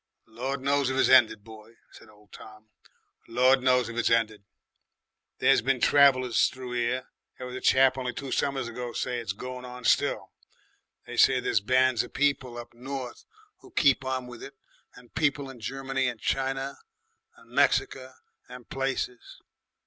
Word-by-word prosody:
"Lord 130 +4 -5
knows 140 0 +1
if 130 - -2
it's - - +3
ended, 115 -5 +5
boy," 110 0 -14 0.2
said 115 - -16
old 105 0 -22
Tom. 110 0 -14 0.6
"Lord 130 +3 +3
knows 125 -2 +3
if 115 - -7
it's 120 - +1
ended. 110 -3 +1 0.9
There's - - +4
been 130 +1 0
travellers 130 -3 +4
through 130 -1 -8
'ere 120 +1 -1 0.3
there 130 - -7
was 125 0 -7
a 130 - -6
chap 130 0 +4
only 125 -1 -3
two 135 +1 -7
summers 135 -3 -1
ago 120 0 -6
say 125 -1 -2
it's 115 -3 -4
goin' 125 +4 -8
on 125 0 -9
still. - - +1 0.7
They - - -8
say - - +5
there's - - +1
bands 130 +1 +2
of 120 - -10
people 130 -3 0
up 120 - -9
north 130 0 -7 0.3
who - - -17
keep 140 - +2
on 130 -1 -3
with 120 -1 -11
it 140 0 -10 0.4
and 125 -1 -17
people 140 -3 0
in 125 - -14
Germany 135 +3 -2
and 120 -2 -4
China 135 +3 -2 0.6
and - - -21
'Merica 130 0 +1 0.3
and 125 -1 -11
places. 135 -2 -4
125 Hz, 165 wpm, -27 LUFS, 120-135 Hz, 0.9 s, ended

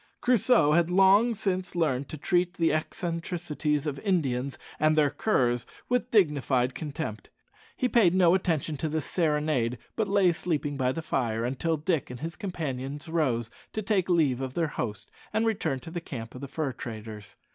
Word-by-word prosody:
Crusoe 245 -9 +4
had 170 +2 +3
long 195 +6 +5
since 185 -4 -2
learned 140 -5 0
to 155 - -6
treat 175 +3 +1
the 165 -3 +2
eccentricities 160 -2 -2
of 145 -2 -3
Indians 140 -8 0 0.2
and 155 +1 +4
their 150 -2 +3
curs 125 - +1 0.2
with 250 0 +1
dignified 140 - +2
contempt. 145 -7 -5 0.5
He 255 - +1
paid 205 -8 +4
no 180 -2 +5
attention 160 -5 0
to 155 - -2
this 155 0 -2
serenade, 150 -7 0 0.2
but 220 -2 0
lay 195 -2 +4
sleeping 155 -4 -2
by 130 -2 +1
the 165 +4 -4
fire 115 -6 -1
until 145 +6 0
Dick 160 -1 -1
and 125 -1 -7
his 165 +3 -5
companions 145 - -4
rose 125 -9 0 0.2
to 215 - -3
take 195 -3 +1
leave 150 -8 +2
of 130 -1 -4
their 165 -3 +1
host 110 -6 -5 0.2
and 220 +1 +2
return 160 -11 0
to 165 - -9
the 175 0 -4
camp 115 -7 -7
of 125 - -9
the 140 - -5
fur 140 0 -2
traders. 110 -4 -8
155 Hz, 175 wpm, -28 LUFS, 135-180 Hz, 0.5 s, long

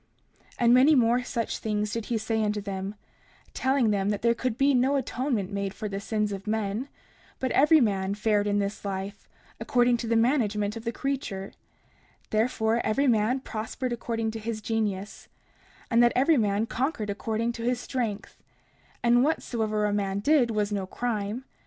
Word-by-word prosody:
30:17 - - -23
And 240 0 +4
many 270 +5 +6
more 245 0 +3
such 235 -2 -3
things 210 -1 -2
did 230 -2 -3
he 235 - 0
say 220 0 -1
unto 210 0 0
them, 195 0 -5 0.6
telling 260 -4 +2
them 200 -1 0
that 205 +1 -2
there 235 0 +4
could 235 -1 -2
be 275 +1 +4
no 260 +2 +3
atonement 245 -6 -1
made 200 -1 -3
for 215 - -4
the 195 -1 -4
sins 210 0 -1
of 195 +1 -6
men, 220 +4 -2 0.5
but 260 - -1
every 310 +3 +6
man 200 -5 +1
fared 210 -1 +1
in 205 0 +1
this 200 0 -2
life 200 0 -5 0.3
according 245 -1 +2
to 235 - -5
the 230 - +1
management 220 -4 +1
of 230 0 -8
the 230 - 0
creature; 235 -8 -3 0.8
therefore 220 +1 +1
every 270 +7 +1
man 240 +1 +2
prospered 240 +2 -4
according 225 -1 -2
to 225 - -6
his 220 0 -4
genius, 210 -3 -3 0.6
and 230 0 +5
that 240 0 +5
every 275 +6 +4
man 210 -3 +1
conquered 230 -4 -2
according 220 +3 -2
to 235 - -8
his 245 0 0
strength; 230 -5 -4 0.6
and 240 +1 +5
whatsoever 220 -8 0
a 205 - 0
man 200 -1 -1
did 255 +3 +3
was 210 -2 -1
no 195 -2 -2
crime. 225 +2 -3
225 Hz, 175 wpm, -27 LUFS, 205-245 Hz, 0.8 s, many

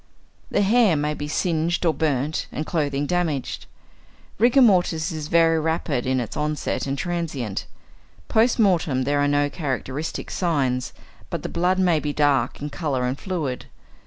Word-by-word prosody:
The 205 - +2
hair 215 -3 +4
may 150 +1 0
be 150 0 -5
singed 170 +2 0
or 165 - +3
burnt 150 0 -1
and 155 - -4
the - - -10
clothing 145 -3 0
damaged. 160 -5 -2 0.7
Rigor 245 +4 +5
mortis 180 -5 +3
is 155 -2 -5
very 165 0 +4
rapid 160 -5 -1
in 130 0 +1
its 120 -4 -4
onset 150 -1 -2
and 135 +1 -2
transient. 155 - -3 0.6
Post 225 +2 +3
mortem 170 - +2
there 145 +2 +1
are 145 - +2
no 145 0 +2
characteristic 145 0 -4
signs, 135 -8 0 0.4
but - - -4
the - - -3
blood 180 +2 +1
may 180 -4 +3
be 150 -1 -3
dark 145 -2 +1
in 145 +1 -5
colour 140 -7 -1
and 125 +2 -2
fluid. 160 -10 -3
155 Hz, 160 wpm, -23 LUFS, 140-175 Hz, 0.7 s, Rigor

